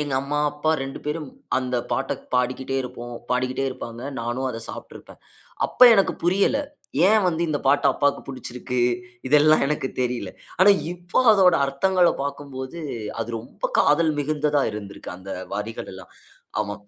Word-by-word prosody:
எங்க 145 -2 -3
அம்மா, 145 +1 -2
அப்பா 150 +1 0
2 135 0 -5
பேரும், 150 0 -3 0.3
அந்த 125 -1 -1
பாட்ட 135 +1 0 0.2
பாடிக்கிட்டே 130 +2 0
இருப்போம் 120 -1 -8 0.2
பாடிக்கிட்டே 130 +1 0
இருப்பாங்க. 120 -2 -7 0.2
நானும் 120 +3 -2
அத 115 - -5
சாப்பிட்ருப்பேன். - - -11 0.5
அப்ப, - - -16
எனக்கு 195 -2 +3
புரியல. 195 +9 +3 0.5
ஏன் 215 0 +4
வந்து, 170 -1 -1
இந்த 150 -2 0
பாட்டு 140 +2 +4
அப்பாவுக்கு 145 -1 +1
பிடிச்சுருக்கு 125 -1 -5 0.5
இதெல்லாம் 150 +2 +5
எனக்கு 145 -2 -1
தெரியல 125 -1 -2 0.3
ஆனா 195 +2 +8 0.2
இப்போ 175 +3 -1
அதோட 185 -4 +5
அர்த்தங்கள 175 +6 +3
பாக்கும்போது, 140 +1 -6 0.4
அது 115 - -3
ரொம்ப 115 +3 -5
காதல் 160 +2 +4
மிகுந்ததா 145 -1 +1
இருந்திருக்கு, 100 -1 -8
அந்த 95 +1 -10 0.2
வரிகள் 105 +3 -5
எல்லாம். 95 -2 -12 0.5
ஆமாம் 105 0 -7
135 Hz, 140 wpm, -23 LUFS, 125-155 Hz, 0.5 s, ஆனா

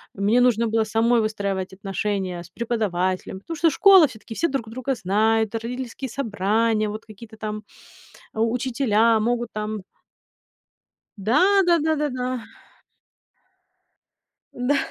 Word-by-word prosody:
Мне 205 +5 +2
нужно 235 -2 +3
было 225 0 +1
самой 230 +2 +2
выстраивать 195 -3 -3
отношения 195 -2 -3
с 175 - -15
преподавателем, 190 -6 -2
потому 330 +11 -7
что 330 +2 +4
школа 380 +1 +7
всё-таки: 225 -3 -11
все 335 - +1
друг 265 -7 -3
друга 255 +4 -2
знают, 220 +2 +1
родительские 250 +3 -5
собрания, 220 -2 0
вот 215 +1 -7
какие-то 220 +1 -13
там, 215 0 -5 0.7
а, 220 - -2
учителя 230 -1 +2
могут 240 +1 -1
там 215 0 -4 1.4
Да 210 +5 +2 0.3
да 345 -1 +4
да 315 +1 +1
да 300 0 -1
да. 250 -2 -3 2.1
Да. 250 +4 0
225 Hz, 125 wpm, -23 LUFS, 210-250 Hz, 2.1 s, школа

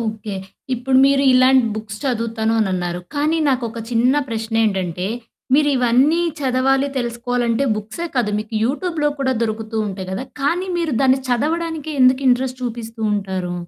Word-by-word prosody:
Okay. 220 -2 -4 0.4
ఇప్పుడు 260 +2 +2
మీరు 275 0 +3
ఇలాంటి 255 0 +5
బుక్స్ 215 -1 -6
చదువుతాను 230 -3 -1
అనిన్నారు, 180 -3 -1
కానీ 305 +3 +1
నాకొక 240 -4 -1
చిన్న 245 +3 +3
ప్రశ్నేంటంటే 220 -6 -1 0.5
మీరు 295 +1 +4
ఇవన్నీ 255 +7 +3 0.2
చదవాలి 270 +1 +2
తెలుసుకోవాలంటే 240 +1 -1
బుక్సే 220 +11 -5
కాదు. 240 -5 +1
మీకు 215 +1 -6
యూట్యూబ్‌లో 300 +3 0
కూడా 265 -1 +1
దొరుకుతూ 220 0 -3
ఉంటాయి 190 -1 -6
కదా! 195 +7 -3 0.2
కానీ 350 +7 0
మీరు 320 -6 -1
దాన్ని 265 0 +4
చదవడానికే 315 +4 -1
ఎందుకు 255 +1 +4
ఇంట్రెస్ట్ 255 +1 +1
చూపిస్తూ 230 -1 -5
ఉంటారు? 190 -3 -3
245 Hz, 135 wpm, -20 LUFS, 220-270 Hz, 0.5 s, ఇలాంటి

